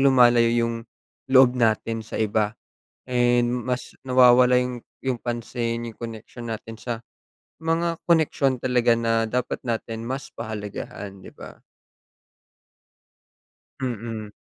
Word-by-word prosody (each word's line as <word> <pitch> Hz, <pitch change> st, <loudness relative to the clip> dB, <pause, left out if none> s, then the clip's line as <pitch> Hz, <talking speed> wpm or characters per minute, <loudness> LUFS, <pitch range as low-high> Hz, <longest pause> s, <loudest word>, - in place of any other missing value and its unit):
lumalayo 120 Hz, -3 st, +6 dB
yung 115 Hz, -1 st, 0 dB, 0.5 s
loob 130 Hz, -1 st, +7 dB
natin 115 Hz, -1 st, +1 dB
sa -, -, -7 dB
iba 110 Hz, 0 st, 0 dB, 0.5 s
and 120 Hz, -1 st, +2 dB
mas 125 Hz, 0 st, -3 dB
nawawala 125 Hz, 0 st, +6 dB
yung 125 Hz, -1 st, -1 dB, 0.2 s
yung 130 Hz, -2 st, 0 dB
pansin 120 Hz, 0 st, -3 dB
yung -, -, -27 dB
koneksyon 115 Hz, +1 st, -7 dB
natin 110 Hz, +1 st, -9 dB
sa 120 Hz, -, -3 dB, 0.7 s
mga 165 Hz, +1 st, 0 dB
koneksyon 150 Hz, -6 st, +2 dB
talaga 125 Hz, -2 st, +3 dB
na 115 Hz, -1 st, +1 dB
dapat 125 Hz, 0 st, -2 dB
natin 115 Hz, -1 st, -3 dB
mas 130 Hz, +3 st, -4 dB
pahalagahan 105 Hz, -3 st, -6 dB
'di -, -, -11 dB
ba? -, -, -12 dB, 2.2 s
Mm. 115 Hz, -4 st, -4 dB
120 Hz, 110 wpm, -24 LUFS, 115-125 Hz, 2.2 s, loob